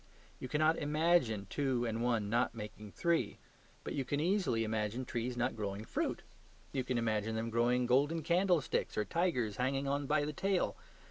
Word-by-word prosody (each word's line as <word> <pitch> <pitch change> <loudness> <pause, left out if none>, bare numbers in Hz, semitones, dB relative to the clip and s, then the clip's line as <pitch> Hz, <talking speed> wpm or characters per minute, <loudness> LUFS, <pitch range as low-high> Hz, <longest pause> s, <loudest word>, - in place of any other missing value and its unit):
You - - -5
cannot 155 +4 +2
IMAGINE 150 - +2
two 130 -4 0
and 115 0 -2
one 120 -4 +1
not 115 +2 +1
making 105 -1 -8
three. 170 - 0 0.5
But - - -4
you 140 - -1
can 145 +2 -1
easily 175 - +1
imagine 110 +3 -2
trees 120 +1 -3
not 120 - 0
growing 105 0 -4
fruit; - - -2 0.5
you 130 -2 -1
can 125 0 -1
imagine 110 -1 0
them 115 +1 -2
growing 120 +2 +2
golden 145 +6 +2
candlesticks 175 -1 +1
or 105 - +1
tigers 125 - 0
hanging 135 +2 0
on 140 0 -1
by 150 0 +2
the 150 - -3
tail. 195 +4 0
125 Hz, 175 wpm, -34 LUFS, 115-150 Hz, 0.5 s, cannot